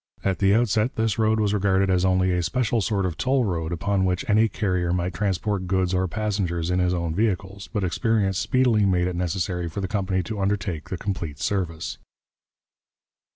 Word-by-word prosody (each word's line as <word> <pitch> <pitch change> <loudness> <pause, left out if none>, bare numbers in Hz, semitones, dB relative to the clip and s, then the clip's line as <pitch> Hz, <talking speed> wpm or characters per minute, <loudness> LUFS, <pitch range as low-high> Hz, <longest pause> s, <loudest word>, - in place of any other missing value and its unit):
At 95 -1 0
the 100 0 +4
outset 115 +1 +1
this 110 -1 0
road 110 0 +3
was 105 -1 +1
regarded 95 -1 +2
as 90 -1 +2
only 95 0 +2
a 90 0 +1
special 115 +5 0
sort 100 -1 0
of 90 -3 -3
toll 130 -1 +2
road 85 -4 -2
upon 100 +3 0
which 95 +8 -1
any 110 +1 +4
carrier 90 -5 -1
might 90 +1 -1
transport 100 -1 -1
goods 95 0 +1
or 95 0 +1
passengers 90 -4 -2
in 90 - +1
his 90 0 +2
own 85 -2 -1
vehicles, 100 -1 -2
but 105 - -1
experience 95 +1 +1
speedily 125 -5 +2
made 90 -2 +2
it 90 - -3
necessary 90 0 -2
for 80 - -5
the 95 - -2
company 95 -2 -1
to 105 0 -4
undertake 95 -5 -2
the 95 - -3
complete 85 -7 -4
service. 85 -3 -2
95 Hz, 190 wpm, -24 LUFS, 90-105 Hz, -, the